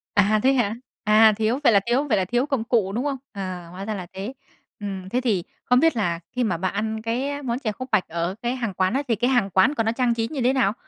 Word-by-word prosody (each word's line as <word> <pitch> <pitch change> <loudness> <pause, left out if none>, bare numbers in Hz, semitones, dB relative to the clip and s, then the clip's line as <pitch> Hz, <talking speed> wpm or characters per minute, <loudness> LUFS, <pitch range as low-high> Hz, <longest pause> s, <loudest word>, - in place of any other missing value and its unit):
À, 205 +2 +4
thế 270 +1 +5
hả? 225 -4 +1 0.3
À, 215 +1 +6
thiếu 225 +5 +1
vậy 235 - +5
là 200 - +6
thiếu 245 +4 +2
vậy 235 - +2
là 185 - +1
thiếu 245 +6 +1
công 270 -6 -1
cụ, 225 -5 +1
đúng 245 +7 -2
không? 275 -2 -1
À, 185 -4 -6
hóa 190 +2 -7
ra 220 - -2
là 180 -2 -6
thế. 200 +7 -5 0.5
Ừm, 195 -2 -5
thế 250 +4 0
thì 210 -8 0 0.2
không 250 0 +4
biết 325 -2 +3
là 175 -6 0
khi 250 - -1
mà 215 - 0
bạn 185 +2 -2
ăn 220 +1 -2
cái 270 +6 -2
món 245 -1 -2
chè 220 -6 -2
khúc 255 +5 -8
bạch 210 -4 +2
ở 170 +3 -2
cái 240 +2 -1
hàng 230 -6 -3
quán 185 +2 +1
á, 275 +2 0
thì 230 - +2
cái 240 +4 +1
hàng 245 -7 +2
quán 190 - +4
của 225 - +1
nó 225 - +1
trang 240 -1 +1
trí 225 -1 -1
như 275 -2 -4
thế 255 +2 +3
nào? 225 -6 +2
225 Hz, 280 wpm, -23 LUFS, 195-250 Hz, 0.5 s, À